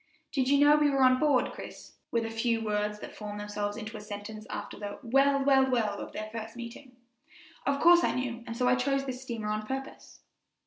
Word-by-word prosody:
"Did 265 -4 0
you 280 - +5
know 290 +1 +6
we 300 -1 +4
were 275 -1 +2
on 255 0 +5
board, 290 -5 +3
Chris?" - - -10
were 230 - +1
the 225 0 -4
first 225 0 0
words 210 0 -1
that - - -9
formed 210 -1 -6
themselves 205 0 -3
into 220 0 -6
a - - -8
sentence 210 +1 -8
after - - -5
the 205 -1 -5
"Well, 275 +3 +3
well, 270 -1 +5
well!" 220 -5 0
of - - -7
their 215 0 -6
first 225 0 -6
meeting. 240 +2 -9 0.7
"Of 280 0 +1
course 345 +2 +7
I - - +1
knew, 245 -2 -3
and 230 0 -5
so 250 - +2
I 250 - +5
chose 275 +2 +1
this 255 -1 -5
steamer 230 -5 -4
on 215 0 -2
purpose." 270 +2 -7
235 Hz, 220 wpm, -29 LUFS, 215-270 Hz, 0.7 s, course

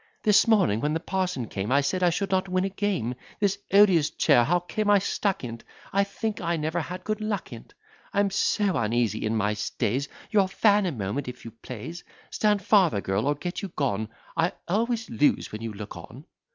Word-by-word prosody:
"This 210 +1 +5
morning, 190 - +3
when 150 +3 0
the - - 0
parson 180 -9 -2
came, 100 +3 -4
I 140 +2 +4
said 185 +7 -1
I 180 - +5
should 195 +3 -2
not 190 0 +1
win 185 +1 +1
a - - -1
game. 190 - -1 0.3
This 200 -1 +1
odious 190 -7 +5
chair, 120 - +4
how 175 +8 +2
came 205 +4 -2
I 205 - +7
stuck 195 -1 -1
in't? 115 -2 -6 0.3
I 200 +1 +4
think 205 +2 -4
I 170 -1 0
never 160 +2 -1
had 180 +3 -7
good 215 +1 -2
luck 205 - -3
in't. 115 - -12 0.4
I'm 200 0 +1
so 200 -1 +1
uneasy 115 -1 0
in 110 +1 0
my 105 0 +1
stays: 115 +5 -2 0.2
Your 200 -4 +4
fan, 205 0 +3
a - - -1
moment, 115 +2 -3
if 125 -1 -8
you 115 - -7
please. 125 +8 -8 0.3
Stand 210 -2 +1
farther, 185 - +4
girl, 100 +5 -1
or 145 - +2
get 175 +4 -5
you 200 - -3
gone; 110 -7 -1 0.3
I 165 +2 +1
always 225 +4 0
lose 145 +6 +1
when 110 - -6
you 115 -1 -4
look 105 0 -8
on." - - -11
175 Hz, 205 wpm, -26 LUFS, 120-200 Hz, 0.4 s, I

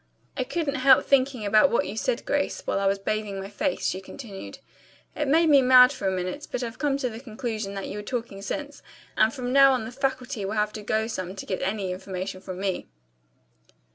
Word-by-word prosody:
I 260 - 0
couldn't 290 0 -2
help 265 0 +6
thinking 260 -4 +2
about 215 +7 +5
what 235 - +1
you 205 - -5
said, 475 - -1
Grace, - - -1
while - - 0
I 195 - +1
was 195 0 +2
bathing 205 0 -3
my 195 +1 -7
face," 280 +7 -2
she 185 - -1
continued. 200 -1 -9 0.6
"It 295 - -1
made 325 +4 +4
me 280 -2 +7
mad 255 0 +8
for 230 -8 -3
a - - +2
minute, 185 +11 -4
but 250 - -2
I've 230 0 -6
come 280 -1 +1
to 260 -3 -1
the 220 - -8
conclusion 220 -4 -5
that 195 - -4
you - - -6
were 210 - -5
talking 225 -3 -4
sense, 290 +7 -5 0.3
and 220 +1 +4
from 250 +1 -4
now 275 -1 +7
on 250 -4 -1
the 225 - -7
faculty 260 -3 -2
will 195 +2 -3
have 210 0 0
to 215 - -6
go 220 +1 0
some 185 -4 -5
to 195 - -7
get 185 - -3
any 195 -1 -2
information 185 0 -5
from 185 -1 -7
me." 190 -2 -2
220 Hz, 225 wpm, -26 LUFS, 195-270 Hz, 0.6 s, mad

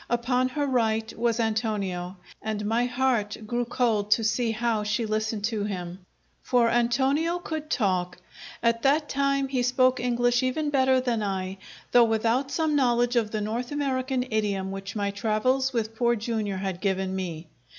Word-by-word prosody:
Upon 250 +2 +1
her 290 +2 -1
right 225 -4 0
was 230 0 0
Antonio, 205 -5 -1 0.2
and 215 -1 -3
my 230 +3 +1
heart 245 -4 0
grew 240 +2 -1
cold 225 -4 0
to 225 +2 +3
see 230 +2 +1
how 225 -1 0
she 215 +2 -1
listened 215 0 -2
to 215 -1 -1
him. 180 -3 -5 0.4
For 245 -2 +3
Antonio 265 +8 +2
could 315 -3 -5
talk. 185 - 0 0.5
At 230 0 +2
that 295 +3 +2
time 275 0 +1
he 260 -2 -1
spoke 255 +1 +3
English 245 0 +2
even 290 +4 -1
better 260 -2 +3
than 240 -3 -1
I, 190 -1 -3 0.3
though 240 -1 +7
without 230 +4 +1
some 315 0 0
knowledge 245 -2 +2
of 225 -3 +2
the 215 0 -3
North 230 +5 -3
American 265 -3 -1
idiom 200 -3 -1
which 195 +1 -6
my 200 -1 -1
travels 230 +6 +1
with 225 -2 -2
Poor 240 +1 +2
Jr. 220 -3 -2
had 190 -1 -4
given 190 -1 -1
me. 175 -3 -4
230 Hz, 165 wpm, -26 LUFS, 210-255 Hz, 0.5 s, though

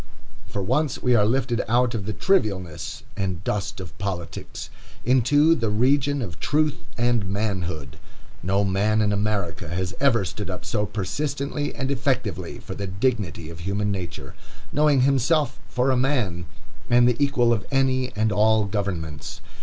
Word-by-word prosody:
For 100 - -3
once 130 +7 0
we 125 - +3
are 105 -3 +5
lifted 125 0 +1
out 120 +1 +3
of 105 -4 -3
the - - -1
trivialness 100 - 0
and 95 -3 -2
dust 100 -1 -2
of 85 -4 -8
politics 95 -4 -5 0.3
into 130 +6 +5
the 115 -8 0
region 135 +5 +2
of 85 -7 -7
truth 150 - +1 0.2
and 120 -5 +1
manhood. 90 - -2 0.4
No 95 +2 +1
man 100 +3 +2
in 105 -1 +2
America 100 -7 -1
has 90 +2 -2
ever 120 -8 +3
stood 95 +3 -5
up 90 - -5
so 105 -3 0
persistently 140 +8 -2
and 135 0 -2
effectively 125 - -1
for - - -8
the 100 - -4
dignity 95 - -1
of 85 - -10
human 100 +4 -1
nature, 90 -8 -5 0.4
knowing 150 -2 +4
himself 135 +1 +2
for 125 +2 +2
a - - +3
man, 120 - 0 0.4
and 120 0 +6
the 125 +3 +2
equal 125 -4 +3
of 105 - -3
any 130 -2 +1
and 110 +1 +1
all 110 +1 +4
governments. 90 -7 -4
110 Hz, 155 wpm, -24 LUFS, 95-130 Hz, 0.4 s, and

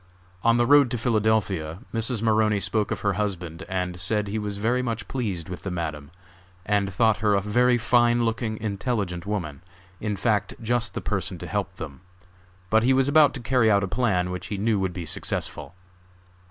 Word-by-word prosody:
On 115 0 +4
the 120 - +3
road 140 0 +6
to 120 - -2
Philadelphia 110 -8 0 0.2
Mrs. 115 0 -1
Maroney 110 -2 +3
spoke 100 +3 0
of - - -3
her 100 -1 +1
husband 90 -4 -4
and 90 -1 -2
said 105 +3 +2
he 105 +2 -2
was 105 -1 -4
very 120 +5 +1
much 115 -3 -3
pleased 100 -11 -3
with 90 -1 -7
the 100 - -4
Madam, 80 -5 -4 0.6
and 100 -1 +1
thought 110 +2 +3
her 105 0 +2
a - - +3
very 120 +5 +3
fine 120 0 +3
looking, 115 -1 -2
intelligent 100 -4 -3
woman, 85 -9 -3 0.4
in 105 -1 -2
fact 105 +1 0
just 120 +1 -1
the - - -3
person - - -2
to - - -8
help - - -3
them; 70 +4 -8 0.7
but 110 +1 +5
he 130 +3 +3
was 135 0 +3
about 150 0 +5
to 125 - -5
carry 120 -2 +3
out 100 -2 +3
a - - -1
plan 90 -6 0
which 90 0 -5
he 105 - -4
knew 105 +1 +1
would 95 -1 -1
be 85 -2 -5
successful. 80 +2 -3
105 Hz, 195 wpm, -25 LUFS, 95-115 Hz, 0.7 s, road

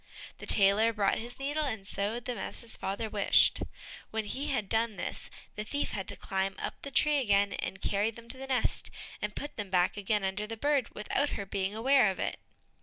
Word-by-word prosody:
The - - -8
tailor 210 +3 +6
brought 205 -3 +2
his 240 +2 -7
needle, 290 +3 -1
and 220 -7 -4
sewed 210 +5 -1
them 245 -5 -3
as - - -4
his 235 -2 0
father 200 +3 -3
wished. 205 -2 +4 0.5
When 220 -1 -2
he 270 +7 -2
had 245 -8 0
done 225 +1 +1
this 175 - -4 0.3
the 210 - -3
thief 285 +6 -2
had 195 -2 -4
to - - 0
climb 195 0 -1
up - - -5
the 280 - -6
tree 295 +2 +4
again, 200 -5 +3
and 195 - -4
carry 205 +2 +2
them 230 +1 -11
to 260 - -3
the 270 - -6
nest, 260 -2 0 0.3
and 210 0 -3
put 290 - -6
them 205 -2 -4
back 180 +1 +2
again 205 0 0
under 195 +2 -1
the 225 +1 -5
bird 285 -1 +1
without 270 +7 0
her 200 - -4
being 195 +1 -2
aware 250 -1 +5
of 190 - -3
it. - - -2
215 Hz, 215 wpm, -31 LUFS, 200-250 Hz, 0.5 s, tailor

